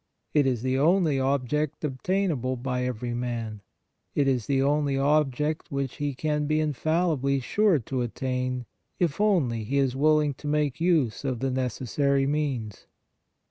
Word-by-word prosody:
It 145 -3 +4
is 125 -3 0
the 130 0 +1
only 160 -2 +3
object 140 +3 -1
obtainable 145 -2 -1
by 125 0 -2
every 125 -1 -3
man. 115 -3 -4 0.5
It 145 -2 +2
is 125 -4 0
the 135 -1 +2
only 145 -1 +1
object 150 +1 +1
which 140 -2 -3
he 145 -2 -2
can 150 +1 -1
be 155 +1 +2
infallibly 155 -2 +1
sure 200 - +2
to 130 0 -3
attain, 125 +1 -2 0.3
if 175 +1 0
only 145 - +2
he 135 +7 -1
is 135 -2 +1
willing 150 +1 +3
to 150 - -6
make 150 0 0
use 160 -11 +2
of 130 -3 -1
the 135 0 -1
necessary 130 +2 0
means. 135 -8 -2
140 Hz, 150 wpm, -26 LUFS, 125-150 Hz, 0.5 s, It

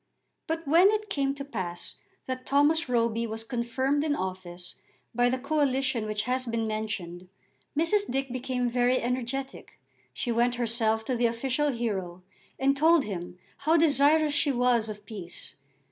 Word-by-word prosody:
But 325 -1 -3
when 340 +7 +6
it 425 0 -1
came 275 -1 0
to 280 -1 -6
pass 185 -10 -5 0.3
that 255 0 -4
Thomas 290 +2 +3
Roby 230 -1 +1
was 220 0 -5
confirmed 260 +4 -1
in 300 -2 +1
office 185 -3 -5 0.4
by 245 +1 +3
the 255 - 0
coalition 270 -4 0
which 215 0 -1
has 255 +2 -1
been 230 -1 -1
mentioned, 200 -5 -4 0.5
Mrs. 400 +6 +2
Dick 270 0 -1
became 250 0 -1
very 245 +1 +2
energetic. 255 - -4 0.3
She 185 - -3
went 240 +1 +2
herself 225 -2 0
to 255 - -1
the 240 0 +3
official 260 +5 0
hero 190 -7 -3 0.3
and 275 +1 +2
told 320 +2 +5
him 180 -3 -6 0.2
how 315 +3 +3
desirous 300 0 +4
she 285 0 +4
was 245 -3 +2
of 210 -1 -8
peace. 195 -5 -9
245 Hz, 155 wpm, -28 LUFS, 220-280 Hz, 0.5 s, when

